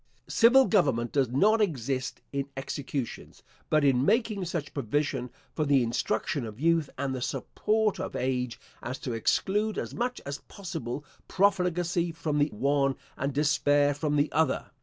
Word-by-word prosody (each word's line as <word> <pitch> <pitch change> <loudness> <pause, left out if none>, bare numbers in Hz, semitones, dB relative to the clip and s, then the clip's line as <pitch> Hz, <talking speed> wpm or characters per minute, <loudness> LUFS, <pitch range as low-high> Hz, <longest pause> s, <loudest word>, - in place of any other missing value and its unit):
Civil 255 +4 +6
government 135 - +2
does 135 -4 +2
not 210 - +3
exist 135 - -1
in 140 0 -2
executions; 135 -1 -5 0.3
but 155 -1 +3
in 135 -2 +3
making 220 - +1
such 165 -4 -4
provision 140 0 -1 0.2
for 155 - 0
the 140 -3 +3
instruction 115 +3 -1
of 110 0 -8
youth 165 -1 +2
and 135 0 -2
the 130 - -4
support 215 - 0
of - - -4
age, 125 -2 -1 0.2
as 130 +2 -4
to 125 -2 -4
exclude, 205 - 0
as - - -4
much 245 +1 -2
as 140 +1 -4
possible, 145 - -6 0.2
profligacy 180 -3 +1
from 160 -2 -2
the 145 - +4
one 140 +2 +1 0.2
and 140 +2 -2
despair 145 0 +3
from 150 +1 -1
the 145 +1 +2
other. 160 -3 0
145 Hz, 155 wpm, -28 LUFS, 130-175 Hz, 0.3 s, Civil